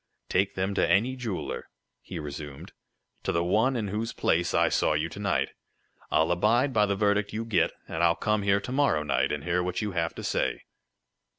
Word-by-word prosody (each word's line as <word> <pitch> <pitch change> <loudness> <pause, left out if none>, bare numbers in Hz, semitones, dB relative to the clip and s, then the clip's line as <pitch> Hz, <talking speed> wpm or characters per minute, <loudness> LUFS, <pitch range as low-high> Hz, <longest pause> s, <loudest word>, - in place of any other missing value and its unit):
"Take 95 +2 +1
them 95 +2 -1
to - - +1
any 110 +9 +3
jeweler," 115 -7 -4 0.3
he 90 - -8
resumed 75 -2 -7 0.5
"to - - -1
the 85 - +1
one 110 +9 +2
in 110 -4 -2
whose 110 +3 -3
place 85 +1 +1
I - - +3
saw - - +2
you 75 +2 0
to 100 - -9
night. 100 -1 0 0.6
I'll 80 +2 +2
abide 115 +9 +2
by 105 -2 +3
the 100 - 0
verdict 105 0 +1
you 110 +1 -3
get, 115 - +2 0.2
and 80 - -3
I'll 85 -1 +4
come 105 +4 0
here 100 0 +3
to - - -6
morrow 130 - +2
night, 75 - +1
and 75 -1 -3
hear 90 +1 +1
what 90 +4 -2
you 105 - -2
have 85 -2 -1
to - - -7
say." - - -1
100 Hz, 205 wpm, -27 LUFS, 85-110 Hz, 0.6 s, I'll